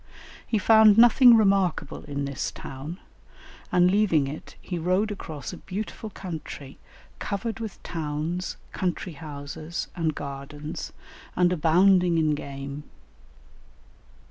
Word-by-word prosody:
He 220 - +1
found 220 0 +6
nothing 240 +1 +8
remarkable 195 -8 +1
in 140 -1 -3
this 140 -1 -3
town, 145 +7 -8 0.7
and 180 0 +4
leaving 185 -9 +3
it 150 +3 -8
he 175 -2 -5
rode 185 +6 +1
across 155 -7 -6
a - - -7
beautiful 215 +3 -6
country, 160 -8 -8 0.4
covered 210 +2 -3
with 220 -4 -7
towns, 160 +2 -3
country 180 -1 -3
houses, 155 +2 -6
and 160 -4 -1
gardens, 145 +2 -6 0.4
and 180 0 +3
abounding 180 +2 +4
in 155 -2 +2
game. 140 0 -6
170 Hz, 115 wpm, -26 LUFS, 150-195 Hz, 0.7 s, nothing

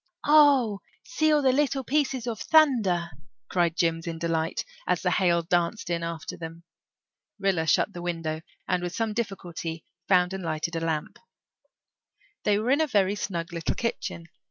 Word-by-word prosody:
"Oh, 280 -9 +5 0.2
see 310 -2 +1
all 300 -1 +3
the 260 - +5
little 275 0 +1
pieces 270 -3 0
of 230 -3 -3
thunder," 220 - +3 0.4
cried 175 -2 +1
Jims 165 0 0
in 165 -1 -3
delight, 165 -1 -1 0.2
as - - +1
the - - +2
hail 170 -3 +2
danced 175 +2 0
in 170 -1 0
after 165 -1 -5
them. 165 0 -8 0.7
Rilla 190 -5 0
shut 145 - +2
the 175 - -7
window 165 -2 -3 0.3
and 180 -1 +1
with 175 0 -4
some 225 -2 -1
difficulty 175 -7 -4 0.2
found 180 -1 +3
and 190 -1 -5
lighted 165 +1 -2
a - - 0
lamp. 160 -2 -3 1.3
They 205 -1 +3
were 225 +4 0
in 285 +3 +4
a 315 - +2
very 200 -6 +2
snug 175 -4 -4
little 170 -1 -2
kitchen. 230 -7 -3
180 Hz, 165 wpm, -26 LUFS, 170-235 Hz, 1.3 s, Oh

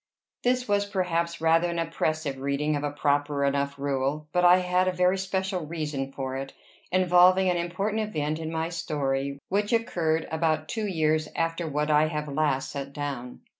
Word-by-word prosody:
This 250 0 +1
was, 205 0 +1
perhaps, 170 -3 -1
rather 165 +1 +3
an 170 - -3
oppressive 155 -4 -1
reading 140 +2 0
of 145 - -3
a 145 - 0
proper 145 0 0
enough 140 0 0
rule; 140 +2 -1
but 180 - +2
I 180 +1 +8
had 180 0 +1
a - - +3
very 180 +1 +2
special 190 -3 -2
reason 150 -4 -3
for 130 -1 -4
it, 135 0 -6 0.4
involving 185 +1 +5
an 175 - 0
important 195 +6 -1
event 155 -7 -2
in 160 0 -4
my 160 0 -2
story, 140 -5 -2
which 205 +2 0
occurred 170 -9 0
about 160 -1 0
two 220 -2 -2
years 155 -4 +1
after 165 0 -1
what 150 +1 0
I 150 +1 +4
have 150 -1 -3
last 140 -2 0
set 140 0 -6
down. 140 -4 -5
160 Hz, 175 wpm, -27 LUFS, 145-180 Hz, 0.4 s, I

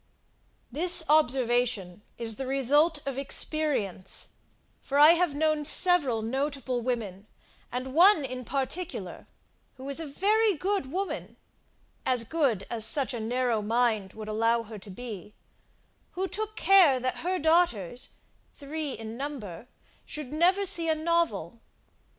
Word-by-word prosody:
This 330 +3 +4
observation 245 - +1 0.2
is 225 -2 -4
the 265 - -5
result 290 +4 +2
of 275 -1 -3
experience; 275 - 0 0.5
for 280 - -3
I 295 +2 +8
have 340 -3 +1
known 310 0 +1
several 290 - +2
notable 265 0 -2
women, 215 -5 -4 0.4
and 255 +1 -4
one 340 -1 +6
in 255 -1 -6
particular, 285 +8 -4 0.5
who 260 - -11
was 280 +2 +1
a 325 - -3
very 415 +7 +2
good 370 -4 -2
woman 385 +3 -4 0.7
as 250 -3 +3
good 255 - 0
as 230 -2 0
such 270 +4 +2
a 240 - -4
narrow 240 0 -1
mind 220 -3 0
would 215 -1 -9
allow 230 +2 +1
her 220 -1 -10
to 195 - -14
be, 210 -1 -9 0.8
who 380 +2 -2
took 435 +2 -5
care 370 -11 +5
that 255 +1 -2
her 370 +2 -2
daughters 300 - +1 0.5
(three 295 0 -5
in 225 +1 -8
number) 245 - -7 0.4
should 300 -2 -7
never 365 +5 +2
see 335 -3 -2
a 315 - +2
novel. 310 - -1
270 Hz, 135 wpm, -27 LUFS, 230-320 Hz, 0.8 s, I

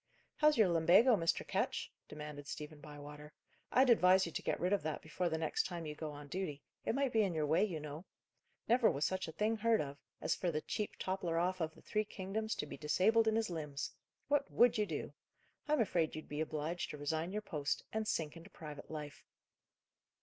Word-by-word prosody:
"How's 305 -2 +5
your 215 -4 +6
lumbago, 175 +9 +6
Mr. 165 -4 0
Ketch?" - - -1 0.2
demanded 150 -1 -7
Stephen 150 +1 -7
Bywater. 150 0 -10 0.4
"I'd 255 0 +6
advise 190 -3 +6
you 165 - -5
to - - -3
get - - -1
rid 180 +3 +1
of 200 - +2
that, 155 -1 -2
before 170 +3 -1
the 160 - -1
next 160 -1 0
time 175 -3 -5
you 150 - -4
go 155 +1 -5
on 145 0 -9
duty; 150 -4 -4 0.2
it - - 0
might 275 -2 +1
be 220 - +5
in 190 -5 +1
your 155 -1 +1
way, 155 +6 +3
you 180 -7 -1
know. 150 +3 -7 0.6
Never 240 0 +5
was 140 +2 0
such 190 -1 -1
a - - -5
thing 215 +6 0
heard 225 0 +3
of, 140 -1 -4 0.2
as - - +1
for 180 - -1
the 155 -2 -1
chief 210 +5 -3
toppler 185 -3 -1
off 180 +1 +1
of 160 -1 -2
the - - -17
three 215 - 0
kingdoms 215 +2 -3
to - - -3
be 150 - -8
disabled 220 +9 +3
in 220 - +3
his 225 -4 0
limbs! 150 -4 -4 0.4
What 285 0 +2
would 240 0 +5
you 210 -1 +1
do? - - -4 0.5
I'm 300 -1 +2
afraid 170 -8 +1
you'd 155 - -7
be 150 +1 -3
obliged 155 +2 -2
to 150 - -6
resign 160 +4 -1
your 210 +1 -3
post, 145 -7 -2
and 220 0 -1
sink 155 -5 -1
into 165 +4 -11
private 150 -5 -9
life." 150 -2 -7
170 Hz, 215 wpm, -36 LUFS, 150-210 Hz, 0.6 s, your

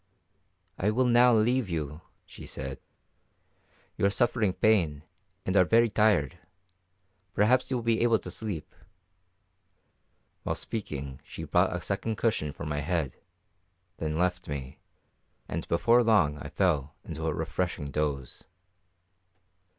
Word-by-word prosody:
"I 100 - +2
will 125 +4 +2
now 125 0 +6
leave 115 0 +2
you," 75 -2 -4 0.2
she - - -11
said. 65 0 -5 1.2
"You - - +1
are - - +3
suffering 115 -1 +2
pain, 85 -11 +2 0.4
and 95 - -1
are 95 - +7
very 115 +4 +3
tired. 100 - +2 1.0
Perhaps 125 +5 +3
you 130 - 0
will 120 - -4
be 115 -1 +1
able 115 -1 +4
to 90 -2 -8
sleep." 90 -4 -5 1.7
While - - -2
speaking 70 - -5
she - - -8
brought - - +2
a - - -3
second 110 -1 -2
cushion 105 -10 0
for 85 - -8
my 75 -1 -2
head, 75 -3 -1 0.8
then 80 -1 -2
left 90 +1 0
me, 70 -2 -6 0.7
and - - -4
before 115 +8 +4
long 100 -11 +3
I - - -7
fell 75 -7 0
into 80 0 -4
a 80 - 0
refreshing 80 -2 -3
doze. 70 -4 -3
90 Hz, 135 wpm, -28 LUFS, 75-110 Hz, 1.7 s, are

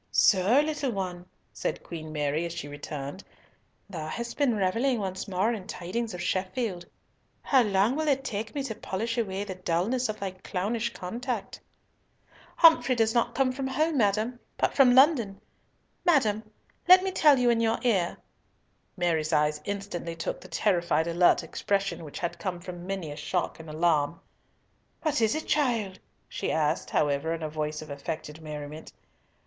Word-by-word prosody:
"So, 200 +6 +4
little 300 -3 -1
one," 180 -3 -4 0.3
said - - -3
Queen 155 -2 -7
Mary, 150 +1 0
as 170 -1 -4
she 165 -4 -5
returned, 145 +3 -6 0.6
"thou 165 -6 -6
hast 235 +8 -5
been 275 -6 +2
revelling 230 +7 +1
once 190 -1 -4
more 195 +4 +1
in 200 -5 -6
tidings 200 +4 -4
of 175 - -6
Sheffield! 185 -1 -2 0.6
How 265 -2 +4
long 210 +2 +2
will 310 +1 -1
it 270 -2 +2
take 220 -2 -4
me 280 - -1
to 240 - -3
polish 225 +2 -3
away 195 -3 -2
the 200 -2 -5
dulness 185 +8 0
of 215 - -4
thy 195 -1 -3
clownish 205 +5 -2
contact?" 230 +2 -4 1.0
"Humphrey 320 -6 +6
does 225 -1 +2
not 235 0 +1
come 265 -1 +2
from 265 +1 -3
home, 305 +4 +1
madam, 220 +3 +1 0.2
but - - +1
from 255 -3 +6
London. 255 -8 +4 0.6
Madam, 220 - +2 0.4
let 365 +1 +9
me 380 - -1
tell 300 -6 +5
you 245 -1 +4
in 230 -1 +2
your 225 -1 +2
ear—" 195 -8 +1 0.8
Mary's 165 -3 0
eye 150 -1 +3
instantly 195 -4 -4
took - - -4
the - - -11
terrified 175 -2 +1
alert 170 +1 +4
expression 195 +2 -1
which 150 - -8
had 175 - -3
come 185 -3 -3
from 175 0 -8
many 190 -6 -3
a - - -6
shock 175 +3 -2
and 160 -1 -10
alarm. 155 0 +1 0.8
"What 300 -5 +1
is 220 +3 +3
it, 310 - -3
child?" 230 -10 0 0.3
she - - -3
asked, 155 -2 0
however, 145 +3 +1
in 165 - -7
a 155 - -2
voice 155 0 -3
of 155 - -10
affected 150 +2 -6
merriment. 150 0 -7
195 Hz, 165 wpm, -28 LUFS, 170-240 Hz, 1.0 s, let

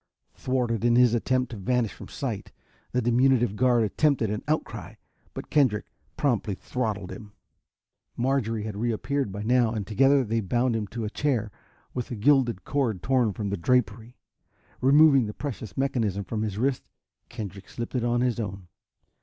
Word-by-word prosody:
Thwarted 120 -4 -1
in 120 0 +4
his 125 -1 +5
attempt 125 +1 0
to 115 - -6
vanish 115 +3 0
from - - -11
sight, - - -5 0.4
the 125 0 0
diminutive 120 -2 +3
guard 120 0 +3
attempted 115 0 +1
an 105 - -3
outcry. 155 +1 -3 0.4
But - - -7
Kendrick 130 -8 +3 0.3
promptly 115 -8 0
throttled 105 -5 -3
him. 100 +2 -10 0.8
Marjorie 120 -4 0
had 110 -2 -5
reappeared 120 +3 -1
by 100 +2 -5
now 120 0 +3
and 105 -3 -3
together 135 +6 +4
they 115 0 -1
bound 120 +4 +1
him 110 -2 -2
to 115 +2 -5
a - - -2
chair 120 -8 -1 0.4
with 125 -2 -4
a 120 - -4
gilded 120 -4 +2
cord 120 -10 -1
torn 125 -5 +2
from 100 0 -4
the 100 - -1
drapery. 115 +3 0 0.6
Removing 140 -2 +6
the 105 - -6
precious 115 -8 -6
mechanism 115 -7 0
from 110 +2 -4
his 105 -3 -3
wrist, 130 +3 -1 0.4
Kendrick 100 -2 -7
slipped 120 0 -6
it 125 -3 0
on 120 0 +1
his 125 -2 0
own. 100 -4 -5
120 Hz, 165 wpm, -26 LUFS, 105-130 Hz, 0.8 s, Removing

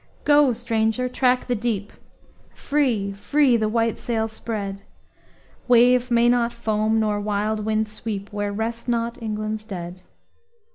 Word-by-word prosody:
Go, 290 -2 +5
stranger! 230 +1 0
track 250 0 +1
the 250 - -1
deep 215 -3 -2 0.6
Free, 250 -9 0
free, 270 +5 +2
the 215 -2 +1
white 230 0 0
sail 225 -2 -1
spread! 205 -3 -5 0.9
Wave 250 +1 +5
may 235 0 +4
not 240 -1 +2
foam, 220 -1 0
nor 210 -1 0
wild 210 +1 -1
wind 220 0 0
sweep, 210 -1 -6
Where 205 0 -2
rest 230 +3 -3
not 235 +1 -1
England's 215 -1 -3
dead. 180 -3 -7
225 Hz, 135 wpm, -23 LUFS, 210-240 Hz, 0.9 s, Go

